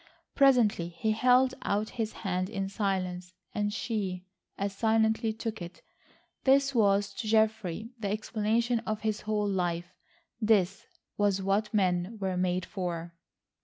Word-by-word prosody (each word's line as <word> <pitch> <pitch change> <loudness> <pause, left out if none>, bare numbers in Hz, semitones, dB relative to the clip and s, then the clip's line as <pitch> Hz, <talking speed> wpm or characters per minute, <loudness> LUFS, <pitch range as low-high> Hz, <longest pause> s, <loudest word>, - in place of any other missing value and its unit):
Presently 245 -11 +4
he 175 +6 -2
held 250 +3 +4
out 210 +2 -1
his 225 -2 -2
hand 185 0 0
in 195 -2 -2
silence, 185 -3 -2 0.2
and 205 -1 0
she 200 -5 -3 0.3
as 200 0 -2
silently 220 +1 +2
took 220 -1 -5
it. 175 0 -9 0.6
This 275 +1 +4
was 200 -3 +3
to 220 +2 -5
Geoffrey 220 -1 +1
the 205 -3 -2
explanation 220 +3 0
of 215 -2 -4
his 215 -1 -1
whole 210 -1 0
life. 175 -3 -1 0.5
This 200 -3 +2 0.3
was 200 -2 +1
what 205 +2 +1
men 185 0 +1
were 190 -2 -1
made 180 0 0
for. 170 -3 -4
205 Hz, 135 wpm, -29 LUFS, 185-220 Hz, 0.6 s, Presently